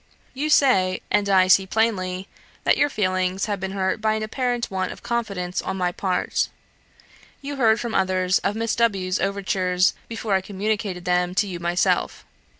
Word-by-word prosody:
You 290 +4 -2
say, 190 -11 +4
and 205 -1 +2
I 190 -1 +5
see 190 +1 +5
plainly, 190 -3 0 0.4
that - - +4
your 290 - +2
feelings 185 -4 0
have 205 -2 -2
been 190 +1 -4
hurt 190 +2 -1
by 215 0 +2
an 220 - -2
apparent 245 +1 -2
want 185 -1 -2
of - - -11
confidence 200 -7 -2
on 190 - -4
my 180 -1 0
part. 185 0 -1 0.9
You 285 0 -6
heard 225 -3 +4
from 235 -2 -4
others 185 0 +2
of 205 - -1
Miss 225 0 -1
W 195 -6 +1
's - - +1
overtures 190 -2 +1
before 225 -2 -3
I 190 - +3
communicated 200 -2 -3
them 180 0 +1
to 205 - +2
you 180 -3 -6
myself. 175 +1 0
195 Hz, 175 wpm, -23 LUFS, 185-220 Hz, 0.9 s, I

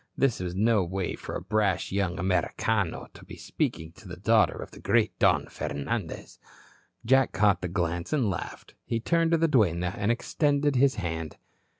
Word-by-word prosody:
This 135 -4 +2
was 90 -1 -4
no 110 0 +3
way 95 +1 -3
for - - -7
a - - -3
brash 105 -4 0
young 95 -2 -1
Americano 95 +2 0
to - - -14
be - - -10
speaking 80 0 -3
to - - -14
the 85 -1 -8
daughter 110 +4 +3
of - - -8
the - - -13
great 110 +1 +1
Don - - +3
Fernandez. 70 0 -5 0.7
Jack 130 +2 +3
caught 105 -2 +3
the 90 - -2
glance 85 -1 -2
and 140 -7 +1
laughed. 95 -5 -5
He 115 - -2
turned 165 +7 +1
to 165 - +3
the 165 +1 +2
duenna 90 - +2
and 105 +2 0
extended 145 +3 +1
his 135 +1 +3
hand. 80 -5 -4
100 Hz, 180 wpm, -27 LUFS, 90-120 Hz, 0.7 s, no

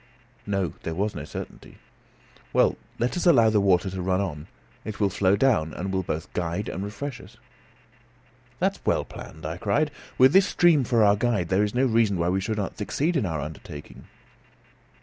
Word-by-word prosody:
No; 100 -3 -1
there 80 - -4
was 100 +4 -1
no 75 - -6
certainty. 75 - -9 0.8
"Well, - - +4 0.2
let 120 +2 -1
us 180 - 0
allow 115 -10 +6
the 105 -2 +3
water 95 -1 +3
to 95 0 -4
run 95 +1 +1
on. 80 -6 -4 0.4
It 110 -2 -6
will 100 -2 +2
flow 95 0 +2
down, 100 - +2
and 95 +2 -4
will 95 - +1
both 85 -1 -5
guide 90 +4 -2
and 95 - -4
refresh 120 +7 -6
us." - - -16 1.2
"That - - 0
is - - -24
well - - +1
planned," 80 - -10
I 80 +2 -4
cried. 145 +11 0 0.3
"With 130 +3 +6
this 195 +1 +6
stream 165 -6 +4
for 115 -2 +3
our 100 -1 +5
guide, 105 -5 0
there 95 +2 +3
is 105 +2 -2
no 130 +2 +3
reason 115 -5 +2
why 85 0 +1
we 95 +1 0
should 110 +2 -2
not 100 -2 -4
succeed 150 - -1
in 125 -10 +1
our 80 -4 -2
undertaking." 75 0 -9
100 Hz, 195 wpm, -25 LUFS, 90-115 Hz, 1.2 s, allow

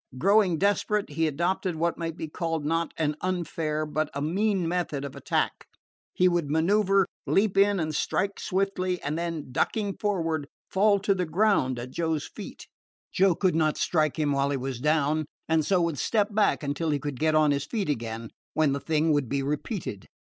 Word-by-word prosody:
Growing 195 +2 +4
desperate, 205 0 +1
he 160 +2 +1
adopted 175 +4 -1
what 170 +2 0
might 165 0 -4
be 160 - -4
called 165 -1 -3
not 165 +2 0
an 150 -2 0
unfair 160 -4 -2
but 155 0 -1
a - - -1
mean 185 +4 0
method 165 -5 -2
of 140 - -7
attack: - - -1 0.4
he 185 - +3
would 175 -5 +1
manoeuver, 195 +5 +3 0.2
leap 200 0 +2
in 200 0 +4
and 155 -2 -2
strike 195 +6 -1
swiftly, 185 -2 -1
and 145 +2 -2
then, 165 -5 -4
ducking 205 - 0
forward, 165 -8 -1 0.2
fall 200 +1 +3
to 200 0 +1
the 180 -3 -2
ground 165 - +2
at 120 +2 -6
Joe's 160 -2 -1
feet. - - -9 0.5
Joe 190 -2 +3
could 185 0 +1
not 155 -2 +2
strike 155 -2 +1
him 150 -2 +1
while 140 0 +1
he 140 - 0
was 130 -1 -4
down, 150 +2 +1 0.2
and 160 -1 +2
so 185 +3 +2
would 165 -4 -1
step 210 -2 +1
back 210 -6 +2
until 145 +3 -1
he 145 - +2
could 140 -2 -5
get 155 0 +2
on 155 -1 +4
his 140 0 -1
feet 210 0 -2
again, 115 -5 -3 0.2
when 155 -3 +3
the 140 - -2
thing 155 +1 +1
would 145 -5 0
be 140 0 0
repeated. 150 - -4
160 Hz, 190 wpm, -27 LUFS, 150-190 Hz, 0.5 s, Growing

